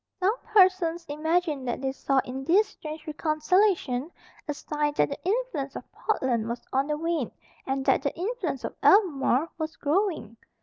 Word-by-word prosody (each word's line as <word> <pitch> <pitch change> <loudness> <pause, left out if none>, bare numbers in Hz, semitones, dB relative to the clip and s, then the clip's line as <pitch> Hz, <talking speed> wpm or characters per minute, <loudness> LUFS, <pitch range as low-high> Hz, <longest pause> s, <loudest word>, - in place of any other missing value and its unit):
Some 380 +3 +3
persons 365 -5 +3
imagined 305 -2 0
that 240 - -2
they 265 0 -1
saw 275 0 -1
in 260 +2 -5
this 395 +8 +4
strange 310 0 -8
reconciliation 310 -2 +1 0.4
a 295 - -1
sign 295 0 -2
that - - +3
the 280 - -7
influence 380 - -1
of - - -8
Portland 245 - -1
was 235 +1 -5
on 270 +2 +2
the 300 0 -1
wane 325 -5 -1 0.4
and 270 0 -1
that - - +3
the 280 - -2
influence 365 - -3
of - - -5
Albemarle 320 - +4
was 315 0 -3
growing. 310 - -1
310 Hz, 165 wpm, -27 LUFS, 270-365 Hz, 0.4 s, this